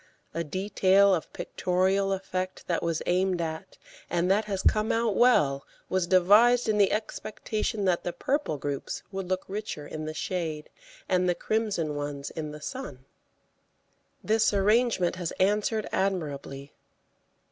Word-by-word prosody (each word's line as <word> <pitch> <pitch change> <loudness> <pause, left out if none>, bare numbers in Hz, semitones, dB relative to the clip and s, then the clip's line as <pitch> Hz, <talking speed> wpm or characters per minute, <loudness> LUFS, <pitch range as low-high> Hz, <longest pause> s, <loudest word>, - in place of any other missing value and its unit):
A 165 +1 -2
detail 190 +3 +3
of 165 - -2
pictorial 190 +2 0
effect 185 -1 -3
that 170 - -1
was 165 -1 -1
aimed 185 0 +1
at, 160 -1 -5 0.3
and 175 +2 +1
that 210 +2 +2
has 195 -2 -3
come 215 0 +2
out 225 -3 +1
well, 145 - +4 0.3
was 185 -2 0
devised 210 +7 +5
in 215 -1 +2
the 200 - +4
expectation 215 -1 -3
that 180 -2 +1
the 175 - -2
purple 275 - -1
groups 140 0 -4
would 190 -2 -5
look 185 0 -1
richer 200 -7 -5
in 155 +1 -6
the 155 0 -5
shade, 160 -4 -3 0.4
and 180 0 +2
the 175 - +2
crimson 200 -10 -1
ones 145 -1 -4
in 155 -2 -5
the 150 0 -9
sun. 200 - -7 1.2
This 220 +1 +3
arrangement 205 -3 +2
has 175 -3 -3
answered 210 +2 +1
admirably. 145 -7 -3
185 Hz, 145 wpm, -27 LUFS, 160-210 Hz, 1.2 s, devised